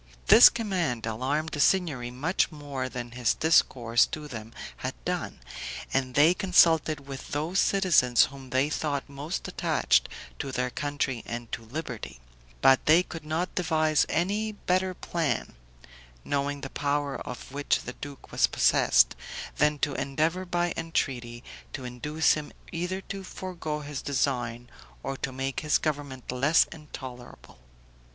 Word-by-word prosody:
This 235 - +11
command 180 - -2
alarmed 130 +8 -1
the 150 - -5
Signory 145 -8 +2
much 145 +12 0
more 140 -4 -5
than 120 -1 -6
his 120 -1 +1
discourse 120 -7 +3
to 155 -2 -6
them 115 -4 -8 0.3
had - - -4
done, - - -3 0.5
and 130 -1 0
they 155 +4 +6
consulted 165 -5 +3
with 135 -1 -7
those 160 +6 -1
citizens 170 - +4
whom 135 -1 -11
they 130 +3 +2
thought 150 -2 -2
most 145 +5 -5
attached - - +2 0.3
to 135 - -3
their 125 0 -1
country 145 -4 -2
and 120 -1 -6
to 115 - -4
liberty; 115 - -6 0.4
but 135 -1 +6
they 165 +4 +6
could 165 -3 -8
not 160 +4 -2
devise 155 -4 +2
any 205 +6 0
better 185 -2 0
plan, 165 -5 -2 0.7
knowing 140 0 -1
the 135 - -6
power 145 -1 -1
of 125 +1 -8
which 145 +1 0
the 125 - -6
duke 140 0 -10
was - - +3
possessed, - - +4 0.4
than 150 0 +3
to 145 0 0
endeavor 160 +8 -1
by 175 -1 0
entreaty 125 -7 -2 0.3
to 130 - -6
induce 150 +6 +1
him 150 -1 -5 0.2
either 180 +3 -3
to 195 0 -7
forego 170 -5 -5
his 145 -1 -5
design 125 -4 -1 0.4
or 135 - -3
to 135 - -3
make 135 +1 -3
his 150 -1 +2
government 140 -5 -4
less 140 +6 +4
intolerable. 130 - -10
145 Hz, 145 wpm, -27 LUFS, 130-165 Hz, 0.7 s, This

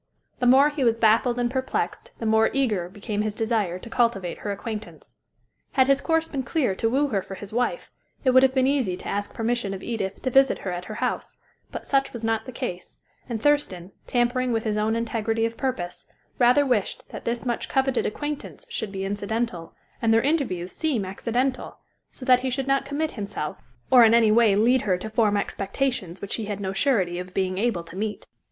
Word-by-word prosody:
The 245 - +2
more 270 +4 +7
he 290 -2 -2
was 230 -2 +3
baffled 230 +2 +3
and 240 -1 0
perplexed, 260 0 -2
the 230 - -5
more 220 0 +4
eager 215 -10 0
became 205 +2 -3
his 210 -1 -2
desire 220 -6 0
to 185 - -11
cultivate 230 -7 0
her 205 - -3
acquaintance. 215 +1 -7 0.6
Had 260 -2 +5
his 275 +1 +3
course 325 -1 +1
been 275 -4 -3
clear 260 - 0
to 225 +4 0
woo 280 +4 +2
her 200 -5 0
for 195 - -8
his 205 +1 -10
wife, 245 - -1 0.3
it 260 - +4
would 260 +1 +7
have 265 0 +3
been 260 -1 +4
easy 260 -10 +1
to - - -9
ask 205 0 -2
permission 225 -3 -1
of 190 - -9
Edith 205 -5 -3
to 255 - 0
visit 270 +1 +5
her 185 - -1
at 180 0 -5
her 215 - -7
house; - - -3 0.3
but - - -6
such 275 0 +1
was 235 -2 -7
not 225 +1 0
the - - -5
case, 230 -8 -6 0.3
and 230 -2 -2
Thurston, 200 -12 +1 0.2
tampering 245 +1 +1
with 225 -1 0
his 215 -2 -1
own 215 +1 +1
integrity 225 -1 0
of 230 0 -3
purpose, 205 -11 -3 0.3
rather 250 +4 +5
wished 245 -7 -1
that - - -8
this 235 +2 -2
much 240 -2 -2
coveted 265 -1 +1
acquaintance 295 - -5
should 220 - -4
be 195 -1 -4
incidental, 205 -3 -3 0.3
and 225 - +3
their 225 0 +4
interviews 255 - 0
seem 275 -11 -1
accidental, 245 +7 -2 0.3
so 255 - -10
that 255 -1 +6
he 260 +1 -2
should 265 +1 -2
not 275 0 +1
commit 295 +3 -2
himself, 200 -8 -5 0.3
or 250 -2 +9
in 225 0 +6
any 225 -2 +5
way 220 -2 +5
lead 240 +5 +4
her 190 -4 +1
to 220 +4 -7
form 215 -2 +2
expectations 200 -2 -2
which 200 - -2
he 225 - -4
had 205 -1 -4
no 190 -1 -3
surety 195 -7 +1
of 180 0 -8
being 185 -1 0
able 220 -6 0
to 165 +1 -12
meet. 210 +2 -3
230 Hz, 210 wpm, -25 LUFS, 200-260 Hz, 0.6 s, or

